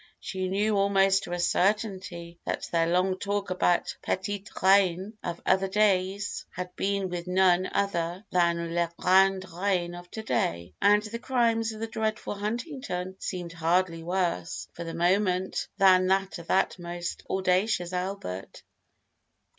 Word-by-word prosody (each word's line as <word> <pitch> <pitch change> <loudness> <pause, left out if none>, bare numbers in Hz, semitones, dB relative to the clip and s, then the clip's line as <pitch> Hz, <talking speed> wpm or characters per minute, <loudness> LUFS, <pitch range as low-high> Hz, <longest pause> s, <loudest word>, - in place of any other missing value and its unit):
she 185 -1 -3
knew 205 +3 +1
almost 195 -1 +3
to - - -8
a 175 - -2
certainty 180 -3 -1
that - - -3
their 165 -1 +2
long 185 +2 +1
talk 200 -1 -2
about 180 -1 +1
Petite 200 +1 -3
Reine 190 +1 +4
of 170 -1 -4
other 190 0 +3
days 200 0 +1
had 180 +1 -6
been 200 -1 0
with 175 -1 -5
none 185 0 +3
other 180 -1 -1
than 170 -1 +1
La 170 0 +1
Grande 190 +1 +4
Reine 180 -1 0
of 175 0 -10
to 220 - -7
day, 85 - -1
and 205 +1 +5
the 225 +2 -6
crimes 230 -3 +1
of 215 - -9
the - - 0
dreadful 220 -1 -2
Huntington 210 - -4
seemed 175 -3 -5
hardly 165 0 +1
worse, 175 - -2
for 170 - -6
the 165 -1 -6
moment, 185 +2 +1
than 185 -2 +5
that 190 -1 +1
of 170 - -11
that 190 -1 +1
most 175 0 -5
audacious 185 -1 +1
Albert! 180 - -5
185 Hz, 145 wpm, -27 LUFS, 175-200 Hz, -, and